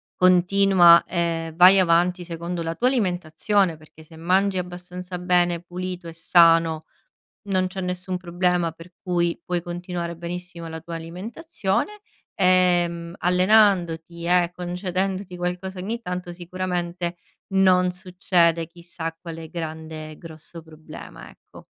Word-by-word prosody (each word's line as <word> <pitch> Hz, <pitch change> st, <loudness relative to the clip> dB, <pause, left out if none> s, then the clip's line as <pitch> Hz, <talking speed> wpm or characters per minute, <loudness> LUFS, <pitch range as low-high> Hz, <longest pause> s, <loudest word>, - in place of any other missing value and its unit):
continua, 185 Hz, -1 st, +5 dB
ehm, 165 Hz, -2 st, -2 dB
vai 185 Hz, +3 st, +8 dB
avanti 175 Hz, 0 st, +2 dB
secondo 170 Hz, 0 st, -5 dB
la 165 Hz, 0 st, -2 dB
tua 245 Hz, -, +1 dB
alimentazione, 185 Hz, -4 st, 0 dB
perché 155 Hz, 0 st, -17 dB
se 160 Hz, +1 st, -16 dB
mangi 185 Hz, +3 st, +1 dB
abbastanza 180 Hz, 0 st, -6 dB
bene, 175 Hz, -1 st, +2 dB
pulito 180 Hz, 0 st, -6 dB
e 165 Hz, -, -8 dB
sano, 165 Hz, -1 st, +4 dB, 0.6 s
non 185 Hz, -1 st, +1 dB
c'è 190 Hz, +1 st, -6 dB
nessun 180 Hz, 0 st, -3 dB
problema, 175 Hz, -1 st, 0 dB
per 165 Hz, +2 st, -15 dB
cui 175 Hz, -2 st, 0 dB
puoi 175 Hz, -1 st, -2 dB
continuare 175 Hz, -1 st, -5 dB
benissimo 170 Hz, 0 st, -7 dB
la 160 Hz, 0 st, -6 dB
tua 170 Hz, 0 st, -7 dB
alimentazione, 215 Hz, -, -4 dB, 0.3 s
ehm, 175 Hz, -2 st, +2 dB
allenandoti 180 Hz, -3 st, +2 dB
e 175 Hz, 0 st, +3 dB
concedendoti 180 Hz, +1 st, -3 dB
qualcosa 180 Hz, +2 st, -4 dB
ogni 220 Hz, +6 st, -4 dB
tanto, 180 Hz, -3 st, -5 dB
sicuramente 175 Hz, 0 st, -4 dB, 0.4 s
non 185 Hz, -1 st, +4 dB
succede 180 Hz, -2 st, +1 dB
chissà 170 Hz, -1 st, -7 dB
quale 165 Hz, -2 st, -8 dB
grande 160 Hz, -2 st, -6 dB
e 155 Hz, -, -12 dB
grosso 165 Hz, 0 st, -10 dB
problema, 155 Hz, -1 st, -12 dB
ecco. -, -, -17 dB
175 Hz, 125 wpm, -23 LUFS, 170-185 Hz, 0.6 s, vai